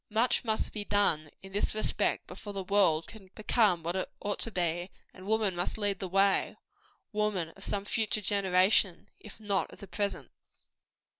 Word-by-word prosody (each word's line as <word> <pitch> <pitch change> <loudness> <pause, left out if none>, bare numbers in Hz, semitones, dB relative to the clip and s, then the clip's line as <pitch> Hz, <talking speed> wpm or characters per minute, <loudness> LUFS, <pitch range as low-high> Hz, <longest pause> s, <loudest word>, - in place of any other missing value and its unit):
Much 225 +3 +2
must 220 -2 -1
be 210 - -3
done, 200 -7 +2
in 195 - -10
this 205 +2 0
respect, 215 - 0
before 205 - -8
the 195 -1 -3
world 185 -5 +3
can 200 -4 -13
become 210 -5 +2
what 170 +2 -2
it 190 - -2
ought 205 0 -2
to - - -2
be; 175 -2 -1 0.2
and 185 0 -12
woman 215 -3 +1
must 175 +4 -2
lead 205 -2 0
the 190 - -3
way 195 +2 +2 0.5
woman 210 -6 0
of 195 +3 -13
some 200 -1 -2
future 215 0 0
generation, 195 -1 +2
if 210 +1 -12
not 205 -3 0
of - - -12
the - - -9
present. 200 +1 -3
200 Hz, 175 wpm, -30 LUFS, 185-210 Hz, 0.5 s, world